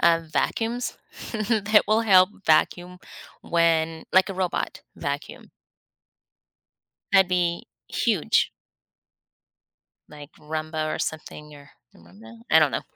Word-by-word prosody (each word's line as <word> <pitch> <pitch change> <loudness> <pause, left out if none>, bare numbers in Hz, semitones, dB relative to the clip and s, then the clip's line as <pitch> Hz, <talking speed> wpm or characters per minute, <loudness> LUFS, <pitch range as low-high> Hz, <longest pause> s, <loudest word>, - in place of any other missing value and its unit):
uh, 165 -1 +4
vacuums 235 +8 -2 0.4
that 215 -1 +2
will 220 +2 +3
help 185 -4 +6 0.2
vacuum 175 +3 +1 0.4
when, 165 -1 0
like, 190 +1 +4
a 195 - -5
robot 185 -2 -3
vacuum. - - -6 1.6
That'd 190 -1 +5
be 175 -2 -1 0.2
huge. - - +1 1.6
Like, 150 0 -13
Rumba 155 0 -4
or - - -5
something 150 -1 -6
or 140 -1 -15 0.3
I - - -19
dont 85 +5 -19
know 110 +1 -13
I 160 - +7
don't 155 -3 +3
know. - - -2
170 Hz, 115 wpm, -24 LUFS, 155-190 Hz, 1.6 s, I